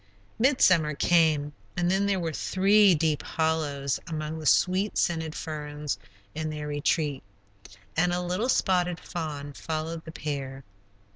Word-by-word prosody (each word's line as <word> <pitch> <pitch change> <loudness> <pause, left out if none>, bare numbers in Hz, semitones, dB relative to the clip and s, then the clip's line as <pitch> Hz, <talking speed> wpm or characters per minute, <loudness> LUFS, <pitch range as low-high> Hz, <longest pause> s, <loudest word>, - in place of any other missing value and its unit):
Midsummer 185 - +4
came, 155 -3 +3 0.2
and 175 0 +2
then 195 +1 +2
there 195 -2 +1
were 165 -2 -2
three 195 +3 +4
deep 155 -1 +1
hollows 150 -4 -1
among 155 0 -4
the 155 - -3
sweet 190 +3 +3
scented 160 -2 0
ferns 150 -5 -4 0.3
in 155 +1 -3
their 150 -1 -5
retreat, 145 -1 0 0.7
and 175 +2 +2
a 175 - 0
little 180 +7 -1
spotted 180 -6 +2
fawn 145 -4 -5
followed 160 +2 -4
the 160 - -9
pair. 135 -3 -5
160 Hz, 135 wpm, -27 LUFS, 150-180 Hz, 0.7 s, Midsummer